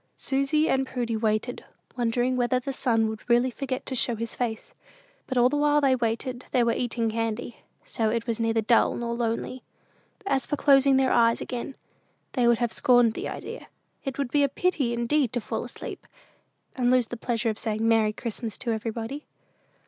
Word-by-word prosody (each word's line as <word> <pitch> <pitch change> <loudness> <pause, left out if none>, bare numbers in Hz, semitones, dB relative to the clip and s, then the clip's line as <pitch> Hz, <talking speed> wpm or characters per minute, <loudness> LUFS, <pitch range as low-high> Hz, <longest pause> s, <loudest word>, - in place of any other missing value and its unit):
Susy 275 +3 +1
and 265 0 +1
Prudy 240 -3 -2
waited, 220 +2 -1 0.3
wondering 245 +1 0
whether 250 0 +1
the 270 +2 -4
sun 225 -4 +1
would 220 0 -5
really 240 +2 +4
forget 260 +1 -4
to - - -4
show 240 -1 +1
his 230 +1 -5
face; 240 - -4 0.5
but 260 - -2
all 245 0 +6
the 275 - -1
while 295 0 +3
they 270 -2 +3
waited 240 +1 -2
they 250 -2 +2
were 235 0 +2
eating 230 -2 -1
candy; 230 +1 -3 0.3
so 220 -1 -1
it 230 +1 -1
was 230 -1 -2
neither 225 0 +1
dull 230 +2 +3
nor 235 -1 -3
lonely. 235 +2 -2 0.6
As 275 -8 +1
for - - 0
closing 275 -1 +5
their 265 -1 +3
eyes 230 0 +4
again, 255 +2 -5 0.6
they 245 -3 +2
would 235 -1 +5
have 240 -1 -1
scorned 245 -3 +4
the - - -4
idea. - - -7 0.4
It 270 -3 -4
would 275 -4 -2
be 290 - +3
a 280 - +3
pity 280 -5 0
indeed 235 +2 +1
to 245 - 0
fall - - -4
asleep, - - -8 0.7
and 245 -2 +1
lose 250 -1 +4
the - - -4
pleasure 230 -1 -1
of 215 - -8
saying 220 0 -1
"Merry 225 -2 +4
Christmas" 225 0 -5
to 235 - -2
everybody. 225 +5 -4
240 Hz, 190 wpm, -26 LUFS, 230-260 Hz, 0.7 s, all